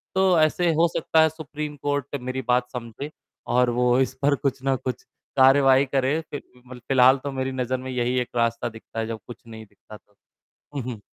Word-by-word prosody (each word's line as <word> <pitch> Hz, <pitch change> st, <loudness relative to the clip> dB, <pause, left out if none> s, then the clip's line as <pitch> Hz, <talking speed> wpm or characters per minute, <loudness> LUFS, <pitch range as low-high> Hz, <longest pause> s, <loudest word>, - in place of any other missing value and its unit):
तो 190 Hz, -3 st, +4 dB
ऐसे 165 Hz, +2 st, +3 dB
हो 165 Hz, +2 st, +4 dB
सकता 160 Hz, 0 st, +3 dB
है 160 Hz, -, +5 dB
सुप्रीम 150 Hz, -1 st, -7 dB
कोर्ट 145 Hz, -1 st, -2 dB
मेरी 130 Hz, +1 st, -3 dB
बात 125 Hz, 0 st, +2 dB
समझे 125 Hz, +4 st, -6 dB, 0.4 s
और 125 Hz, 0 st, +3 dB
वो 125 Hz, +1 st, +3 dB
इस 130 Hz, -1 st, +1 dB
पर 140 Hz, 0 st, +3 dB
कुछ 135 Hz, -2 st, -2 dB
ना 135 Hz, -1 st, +2 dB
कुछ 130 Hz, -1 st, -5 dB, 0.3 s
कार्यवाही 135 Hz, 0 st, +6 dB
करे। 135 Hz, +3 st, 0 dB
फि 150 Hz, -2 st, -7 dB
अ, -, -, -10 dB, 0.3 s
मल 130 Hz, -1 st, -10 dB
फिलहाल 130 Hz, 0 st, +6 dB
तो 140 Hz, -, -3 dB
मेरी 130 Hz, 0 st, -2 dB
नज़र 130 Hz, 0 st, -2 dB
में 130 Hz, +1 st, -7 dB
यही 125 Hz, 0 st, 0 dB
एक 125 Hz, -, -3 dB
रास्ता 115 Hz, 0 st, 0 dB
दिखता 115 Hz, 0 st, -9 dB
है 110 Hz, -, -2 dB
जब 115 Hz, -1 st, -5 dB
कुछ 120 Hz, -2 st, -10 dB
नहीं 110 Hz, -1 st, -10 dB
दिखता 105 Hz, +1 st, -15 dB
तो। 105 Hz, -, -35 dB, 0.6 s
हुँ, 140 Hz, -, -2 dB
हुँ। 120 Hz, -4 st, -6 dB
130 Hz, 210 wpm, -24 LUFS, 125-145 Hz, 0.6 s, कार्यवाही